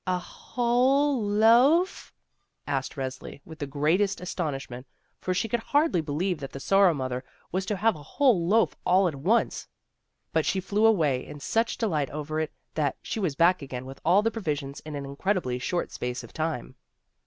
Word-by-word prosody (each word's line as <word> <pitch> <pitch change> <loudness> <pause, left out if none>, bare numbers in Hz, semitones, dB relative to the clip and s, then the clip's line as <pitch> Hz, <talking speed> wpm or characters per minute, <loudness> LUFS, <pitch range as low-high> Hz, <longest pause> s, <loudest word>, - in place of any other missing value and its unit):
"A 185 0 +2
whole 250 +7 +1
loaf?" 235 - +4 0.5
asked 135 -2 -2
Resli, 130 0 -6
with 160 -1 -11
the 145 - -3
greatest 160 +8 +1
astonishment; 135 -8 -4 0.3
for 185 - -3
she 185 +5 0
could 235 +2 0
hardly 290 - +2
believe 160 +3 -2
that 135 -2 -7
the 135 - -6
Sorrow 195 +2 +4
mother 130 -1 -3 0.3
was 185 +1 -2
to 210 - 0
have 220 +3 +2
a 150 - -10
whole 190 - +2
loaf 225 +4 +3
all 185 +1 +4
at 165 - -2
once. 180 +13 0 0.7
But - - +2
she 190 - 0
flew 205 +4 +2
away 150 -12 +2
in 145 - -10
such 225 +10 0
delight 155 - 0
over 155 +1 -4
it 155 -1 -2 0.2
that 145 -3 -1
she - - -4
was 175 -9 -1
back 175 +2 +4
again 130 -2 -6
with 135 +1 -10
all 185 +5 +4
the 225 - +1
provisions 145 -10 -3
in 155 -1 -8
an 140 -1 -5
incredibly 140 -2 -1
short 175 +7 -2
space 125 0 -4
of 115 - -13
time. 155 -6 -3
175 Hz, 180 wpm, -27 LUFS, 140-210 Hz, 0.7 s, loaf